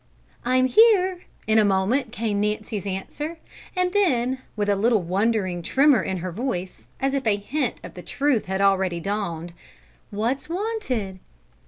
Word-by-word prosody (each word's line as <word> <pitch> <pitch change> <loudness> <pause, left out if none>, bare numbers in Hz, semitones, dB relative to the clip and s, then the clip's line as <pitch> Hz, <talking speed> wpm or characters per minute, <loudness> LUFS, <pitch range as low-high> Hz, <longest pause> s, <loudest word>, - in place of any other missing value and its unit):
"I'm 255 +1 +3
here!" 375 - +4 0.2
in 220 0 +4
a - - +5
moment 210 +6 +1
came 215 -3 -1
Nancy's 210 -1 -2
answer, 295 - -4 0.4
and 365 0 +1
then, 260 -11 +2 0.2
with 205 -2 -1
a 205 - +3
little 215 0 +2
wondering 190 0 0
tremor 275 - +4
in 190 - -2
her 185 - -3
voice, 185 - -4
as 270 0 0
if 270 -4 -1
a 210 - +4
hint 245 +9 -2
of - - -9
the - - -9
truth 275 -7 0
had 190 +1 -1
already 190 -3 +2
dawned: 175 -3 -3 0.6
"What's 235 +8 -2
wanted?" 335 - -3
220 Hz, 155 wpm, -24 LUFS, 195-275 Hz, 0.6 s, a